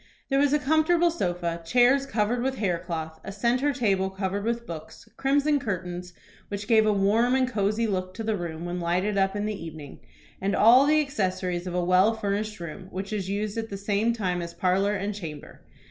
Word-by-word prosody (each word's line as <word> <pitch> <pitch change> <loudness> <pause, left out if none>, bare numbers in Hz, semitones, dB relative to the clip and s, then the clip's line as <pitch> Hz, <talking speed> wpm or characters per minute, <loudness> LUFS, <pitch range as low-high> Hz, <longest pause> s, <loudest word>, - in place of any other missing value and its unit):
There 275 - +3
was 285 -1 +3
a 295 - +4
comfortable 315 +4 +3
sofa, 175 - -2
chairs 250 +8 +3
covered 225 +1 0
with 265 +1 -1
hair 180 -5 0
cloth, 160 -2 -5
a - - -6
centre 245 +7 +1
table 200 -8 +1
covered 190 +1 -3
with 235 0 -1
books, 165 +4 -9
crimson 285 +3 +2
curtains, 180 -5 -4 0.4
which 205 0 -5
gave 220 -2 +4
a - - +4
warm 215 +5 +3
and 260 -1 +2
cosey 215 -1 0
look 185 -3 -2
to 225 - -5
the 220 -1 0
room 170 -3 -5
when 175 +1 -3
lighted 180 +4 0
up 195 0 +1
in 205 0 -1
the 215 - -1
evening, 155 -4 -9 0.4
and 195 +1 0
all 250 +6 +6
the 310 +1 +4
accessories 185 -9 -2
of 180 - -4
a 180 -1 0
well 185 +5 +4
furnished 210 0 -2
room 170 +2 -7
which 195 +3 -5
is 195 -3 -3
used 210 +2 -2
at 225 0 -5
the 195 - -5
same 205 +3 +1
time 185 -6 -1
as 170 0 -7
parlor 195 +4 +1
and 200 +1 -2
chamber. 160 -7 -8
200 Hz, 205 wpm, -26 LUFS, 180-235 Hz, 0.4 s, all